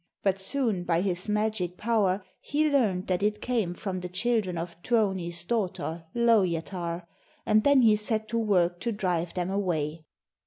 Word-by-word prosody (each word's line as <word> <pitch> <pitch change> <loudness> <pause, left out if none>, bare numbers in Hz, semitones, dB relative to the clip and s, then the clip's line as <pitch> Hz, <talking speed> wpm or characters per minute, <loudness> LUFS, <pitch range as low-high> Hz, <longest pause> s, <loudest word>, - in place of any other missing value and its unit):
But 195 -1 +1
soon 215 -3 +1
by 170 -1 +1
his 185 +1 -2
magic 210 -4 0
power 210 -4 +1 0.2
he 305 +2 0
learned 220 -11 +1
that 180 0 0
it 210 +1 +1
came 220 -9 -1
from 185 0 -4
the 180 0 -6
children 200 -1 0
of 170 +1 -6
Tuoni's 190 -6 0
daughter, 175 -5 -2
Lowjatar, 180 -6 +1 0.4
and 215 0 +4
then 280 -3 +5
he 220 -2 +6
set 215 +1 -1
to 230 - 0
work 180 -5 +2
to 235 - -2
drive 180 -5 -1
them 180 0 -1
away. 165 -5 -2
190 Hz, 160 wpm, -27 LUFS, 175-220 Hz, 0.4 s, he